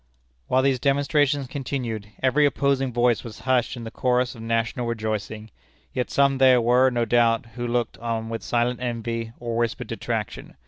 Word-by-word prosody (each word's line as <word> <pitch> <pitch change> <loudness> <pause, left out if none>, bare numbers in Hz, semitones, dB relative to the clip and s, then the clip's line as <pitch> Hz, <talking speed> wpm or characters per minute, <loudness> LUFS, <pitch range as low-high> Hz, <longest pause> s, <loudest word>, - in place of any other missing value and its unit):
While 130 0 +2
these 135 -2 +2
demonstrations 145 +1 +2
continued, 125 -6 -4 0.2
every 140 +3 +4
opposing 140 -2 0
voice 120 -1 +2
was 115 -2 -9
hushed 130 -1 +1
in 120 - -7
the 115 - -7
chorus 125 0 +1
of 115 - -11
national 115 +2 -1
rejoicing; 110 -1 -4 0.4
yet 125 - -2
some 140 -1 +2
there 130 -2 +6
were, 125 +3 +4
no 120 -2 0
doubt, 115 0 +3
who 120 0 -4
looked 120 0 -1
on 115 -1 -3
with 115 0 -4
silent 120 +1 0
envy 115 -2 -3
or 120 -1 -4
whispered 115 -1 -1
detraction. - - -4
120 Hz, 170 wpm, -24 LUFS, 115-130 Hz, 0.4 s, there